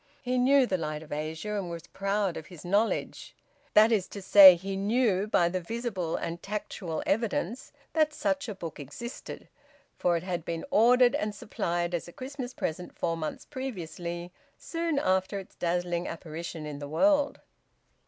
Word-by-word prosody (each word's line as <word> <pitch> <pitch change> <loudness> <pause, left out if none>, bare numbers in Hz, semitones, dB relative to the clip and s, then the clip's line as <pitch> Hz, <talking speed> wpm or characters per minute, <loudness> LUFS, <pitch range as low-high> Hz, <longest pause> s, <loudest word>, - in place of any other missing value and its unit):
He 250 0 0
knew 270 +1 +5
"The 185 -6 -1
Light 155 -1 -4
of 155 - -16
Asia," 160 +7 -3
and 185 -3 -4
was 170 -1 -7
proud 195 -2 -1
of 160 - -7
his 175 -3 -12
knowledge; 205 +5 0 0.4
that 215 +2 +7
is 205 -5 +2
to 205 - -8
say, 190 -1 +10
he 195 +3 -5
knew 205 -1 +1
by 175 -5 +3
visible 185 0 -3
and 170 +1 -4
tactual 195 -5 -4
evidence 225 +1 -1 0.2
that 310 -1 +3
such 285 -4 -1
a 210 - -4
book 165 -5 -7
existed, 145 - -8 0.5
for 175 -1 +2
it 165 - -5
had 175 -3 -3
been 165 0 -4
ordered 250 -1 +6
and 210 0 -1
supplied 175 -4 -2
as 175 - -2
a 175 - -11
Christmas 260 -1 -6
present 180 -5 -4
four 165 -1 0
months 155 -2 -5
previously, 175 - -5 0.3
soon 330 -3 -2
after 190 -4 +1
its 195 - -9
dazzling 175 0 -1
apparition 165 -1 -6
in 150 -1 -6
the 145 -1 -6
world. 290 - +2
185 Hz, 165 wpm, -29 LUFS, 170-235 Hz, 0.5 s, say